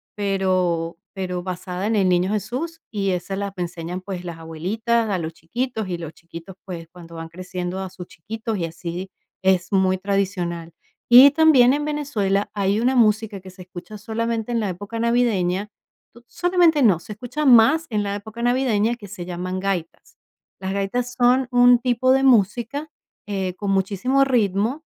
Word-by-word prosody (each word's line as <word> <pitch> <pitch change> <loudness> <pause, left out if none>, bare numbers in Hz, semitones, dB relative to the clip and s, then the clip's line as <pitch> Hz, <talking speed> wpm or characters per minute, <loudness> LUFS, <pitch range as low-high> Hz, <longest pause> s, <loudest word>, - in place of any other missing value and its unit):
pero 185 -4 0 0.2
pero 180 -2 -4
basada 185 +1 -4
en 225 - +1
el 195 -3 +3
niño 180 +2 +2
Jesús 255 - -4
y 200 -3 -1
esa 180 +2 -3
la 200 -1 -3
enseñan, 175 0 -5
pues, 185 -2 -6
las 170 -2 -6
abuelitas 215 +9 -1
a 195 - 0
los 165 -2 -4
chiquitos 220 +5 -4
y 175 - -3
los 165 -2 -7
chiquitos, 170 +3 -11
pues, 170 -3 -7
cuando 170 -1 -13
van 165 0 -7
creciendo 180 +1 -5
a 190 -1 -4
sus 180 -1 -10
chiquitos 220 +5 -5
y 170 - -1
así, 170 +3 -6 0.3
es 185 -1 +2
muy 190 -1 +2
tradicional. 180 -4 -2 0.4
Y 255 +4 +10
también 285 -5 +6
en 295 +1 -1
Venezuela 220 -10 -1
hay 200 +1 0
una 255 +2 +2
música 215 -2 +2
que 190 0 -12
se 185 0 -14
escucha 180 +3 -10
solamente 230 +2 -3
en 235 - +1
la 215 - -1
época 205 +5 -6
navideña 210 -5 +1 0.6
solamente 350 -4 +2
no, 195 -8 +5
se 210 - -9
escucha 250 +8 -4
más 265 +6 +6
en 215 -3 0
la 200 0 -2
época 220 +3 -8
navideña, 240 -2 +1
que 215 -4 -12
se 180 -3 -7
llaman 180 +1 -4
gaitas. 185 -4 -4 0.4
Las 190 - -3
gaitas 240 +6 -2
son 250 +1 +3
un 245 0 +6
tipo 255 +1 +2
de 270 0 +2
música, 245 +5 +2 0.4
eh, 190 -3 -2
con 200 0 -2
muchísimo 200 +8 +2
ritmo, 230 - 0
200 Hz, 170 wpm, -22 LUFS, 180-240 Hz, 0.6 s, Y